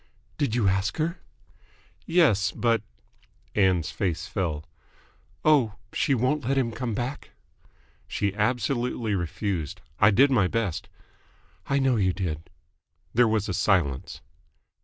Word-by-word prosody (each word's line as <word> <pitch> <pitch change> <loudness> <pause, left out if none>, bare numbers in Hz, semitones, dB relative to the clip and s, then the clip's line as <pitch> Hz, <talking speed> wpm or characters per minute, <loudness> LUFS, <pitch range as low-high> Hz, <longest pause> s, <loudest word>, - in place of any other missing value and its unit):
"Did 130 -6 0
you 115 -5 +2
ask 95 +2 0
her?" 165 +3 -1 0.9
"Yes. 125 - +3
But 115 -3 +1 0.4
" - - -35
Ann's 95 -5 +2
face 90 -5 -2
fell. 80 -5 -3 0.8
"Oh! 135 -9 +4 0.2
She 140 - +2
won't 130 +5 +1
let 135 +2 0
him 125 -3 +1
come 115 -1 -3
back?" 125 +5 -4 0.8
"She 100 -2 -1
absolutely 120 +1 0
refused. 85 -3 -2 0.2
I 100 - +7
did 135 +7 +5
my 105 -8 +4
best." 100 -3 -2 0.8
"I 140 - +1
know 135 -3 +2
you 95 -3 +2
did." 85 -4 -4 0.6
There 120 0 +5
was 110 -1 0
a 95 - -2
silence. 85 -10 0
110 Hz, 130 wpm, -26 LUFS, 95-125 Hz, 0.9 s, I